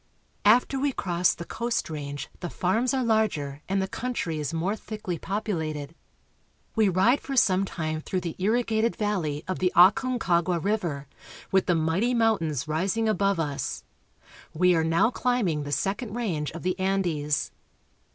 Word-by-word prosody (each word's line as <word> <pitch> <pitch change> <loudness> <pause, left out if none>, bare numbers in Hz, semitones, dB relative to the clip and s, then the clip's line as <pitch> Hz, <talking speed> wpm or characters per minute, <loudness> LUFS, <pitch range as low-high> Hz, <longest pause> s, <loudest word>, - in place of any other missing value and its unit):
After 245 +5 +4
we 280 0 0
cross 175 -4 +1
the 170 - -7
coast 235 +4 -2
range 145 -2 -5
the 175 - -4
farms 220 +10 0
are 265 -1 0
larger 190 - 0
and 195 +1 +1
the 190 - 0
country 190 -9 -3
is 150 - -2
more 170 +5 -1
thickly 210 -6 -5
populated. 160 -8 -3 0.8
We 220 -3 +4
ride 190 +9 +3
for 275 - -5
some 195 -5 +4
ii8 - - -9
CHILE. - - -10
time 155 -1 -2
through 185 +3 -2
the 170 -3 -4
irrigated 225 +2 +1
valley 170 -8 -1
of 185 - -3
the 180 -1 +2
Aconcagua 180 -2 +4
river, 170 -7 -1 0.5
with 190 -1 +3
the 175 - +3
mighty 165 +10 +1
mountains 165 - +1
rising 190 +8 0
above 200 -3 +1
us. 140 - -3 0.7
We 180 +2 +4
are 160 - +2
now 165 +8 +3
climbing 210 -14 0
the 145 - -5
second 205 - -2
range 175 -11 -2
of 165 - -8
the 185 +1 -1
Andes. 175 -7 0
185 Hz, 160 wpm, -26 LUFS, 160-220 Hz, 0.8 s, After